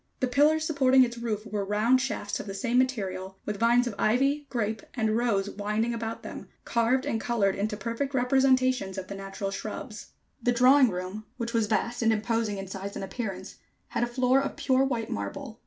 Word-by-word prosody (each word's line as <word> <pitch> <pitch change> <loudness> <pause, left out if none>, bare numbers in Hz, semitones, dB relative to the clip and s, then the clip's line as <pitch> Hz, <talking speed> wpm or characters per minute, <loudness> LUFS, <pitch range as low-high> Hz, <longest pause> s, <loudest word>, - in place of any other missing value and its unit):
The - - +2
pillars 300 +5 +3
supporting 265 -4 +5
its 235 -1 -3
roof 220 -2 -3
were 210 -2 -2
round 215 +6 +2
shafts 230 -6 -3
of - - -7
the 195 - -5
same 245 +3 +1
material, 190 -7 -2
with 210 -1 -3
vines 240 +2 +4
of 240 - -3
ivy, 275 +6 +2
grape 220 -3 -2
and 220 -3 +1
rose 225 -4 +1
winding 210 +3 -1
about 225 -1 -4
them, - - -8 0.2
carved 240 +3 +1
and 225 - -1
colored 215 -5 +1
into 210 +2 -2
perfect 230 +7 -3
representations 255 -5 +2
of 185 -1 -6
the - - -4
natural 195 0 -5
shrubs. 195 - -6 0.3
The 245 - +2
drawing 255 +2 +6
room, 185 +3 -5
which 235 -1 -4
was 225 -2 +2
vast 235 +3 -1
and 225 -1 +4
imposing 220 -1 0
in 195 - -5
size 195 +1 -6
and - - -4
appearance, 195 -3 -6 0.3
had - - -2
a - - +1
floor 255 +2 +2
of 275 - -3
pure 260 0 +2
white 240 -5 -2
marble. 100 -1 -5
230 Hz, 195 wpm, -27 LUFS, 205-255 Hz, 0.3 s, drawing